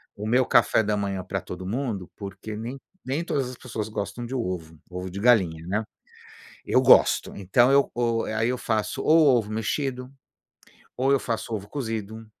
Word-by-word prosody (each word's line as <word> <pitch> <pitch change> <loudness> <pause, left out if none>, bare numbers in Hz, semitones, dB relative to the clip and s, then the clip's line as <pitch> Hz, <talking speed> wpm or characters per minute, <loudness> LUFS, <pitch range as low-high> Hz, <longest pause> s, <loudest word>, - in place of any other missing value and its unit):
o 105 +1 -5
meu 125 +2 +3
café 115 -1 +4
da 105 0 0
manhã 100 -2 -2
para 95 +1 -3
todo 90 0 -8
mundo, 110 -4 -3
porque 100 +1 -7
nem 120 +5 -5 0.3
nem 140 +6 -1
todas 135 -6 -1
as 130 - -8
pessoas 110 -4 -5
gostam 110 +3 -4
de 130 +3 -5
ovo, 90 -8 -4
ovo 90 +1 -5
de 100 +2 -6
galinha, 90 -9 +3
né. 105 +4 0 0.8
Eu - - +3
gosto, - - +5
então 120 +8 +3
o 115 -1 0
e - - -3
aí 110 +2 +1
eu 125 - -1
faço 110 +3 -1
ou 155 -5 +5
ovo 105 -2 -2
mexido, 125 +4 -2 0.9
ou 135 +2 +2
eu 140 - +3
faço 115 -1 -3
ovo 100 -1 -5
cozido 110 -4 -5
110 Hz, 180 wpm, -25 LUFS, 100-125 Hz, 0.9 s, gosto